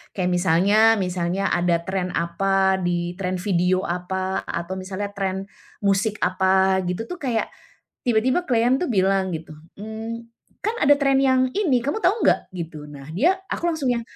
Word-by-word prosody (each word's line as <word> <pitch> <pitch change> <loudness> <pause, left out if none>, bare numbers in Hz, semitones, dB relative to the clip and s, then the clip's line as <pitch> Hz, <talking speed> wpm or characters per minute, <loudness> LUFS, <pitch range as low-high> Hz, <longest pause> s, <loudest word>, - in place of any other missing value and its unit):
Kayak 180 -2 0
misalnya 180 +3 +3 0.2
misalnya 180 0 -1
ada 175 -1 +2
trend 190 -1 -2
apa, 190 +3 +1
di 175 0 -1
trend 185 -1 -2
video 185 -1 +1
apa, 185 +2 -2
atau 170 +2 -4
misalnya 190 +2 -5
trend 195 -1 -2 0.4
musik 200 +2 +1
apa 190 +1 +3
gitu 180 +5 -3
tuh 360 -1 -7
kayak, 235 -5 0 0.6
tiba-tiba 250 +8 +2
klien 245 +2 +3
tuh 360 - -1
bilang 195 -3 +2
gitu. 160 0 -11 0.2
"Mmm, 220 +2 -6 0.4
kan 440 - 0
ada 290 0 +6
trend 275 -1 +3
yang 260 -1 +4
ini, 335 -12 +2
kamu 290 - -1
tahu 425 +3 +2
enggak?" - - +2
gitu, 155 -3 -7
nah 140 -2 -10
dia 325 - +3 0.2
aku 345 - -1
langsung 290 -7 0
yang, 235 - -1
195 Hz, 160 wpm, -23 LUFS, 180-235 Hz, 0.6 s, ada